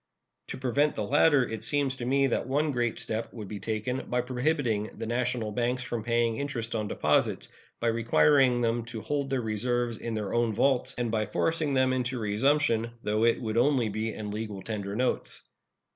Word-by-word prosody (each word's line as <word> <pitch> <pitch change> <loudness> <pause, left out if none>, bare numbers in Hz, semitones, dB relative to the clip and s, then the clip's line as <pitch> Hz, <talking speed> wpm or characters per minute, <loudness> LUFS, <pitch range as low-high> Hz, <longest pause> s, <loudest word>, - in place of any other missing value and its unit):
To - - -6
prevent 135 +4 +1
the 110 - -2
latter 140 +2 +4
it 110 - -5
seems 140 -2 +1
to 120 - -4
me 135 +2 +3
that 130 - 0
one 145 +3 +1
great 120 -3 -1
step 110 +1 -3
would 105 -4 -7
be 105 +1 -6
taken 110 +5 -3
by 125 0 +1
prohibiting 125 -4 0
the - - -4
national 120 -1 -1
banks 125 +3 -1
from 120 -2 -4
paying 115 -1 +1
interest 125 -6 -3
on 110 -2 -1
deposits, - - +1 0.3
by 120 - +1
requiring 120 +2 +4
them 115 0 +1
to 115 -2 -7
hold 140 +1 -2
their 135 -2 0
reserves 120 +2 -1
in 115 0 -4
their 105 -3 -3
own 120 -1 +2
vaults, 130 +3 +2
and 120 -2 -1
by 110 -1 0
forcing 160 -4 0
them 130 0 +3
into 125 0 -1
resumption, 115 +2 +1
though 105 +2 +1
it 115 - +3
would 110 -2 -3
only 125 -2 +3
be 110 +2 -2
in 105 -1 -6
legal 105 -2 -5
tender 100 -2 -4
notes. 125 +2 -1
120 Hz, 190 wpm, -28 LUFS, 110-130 Hz, 0.3 s, latter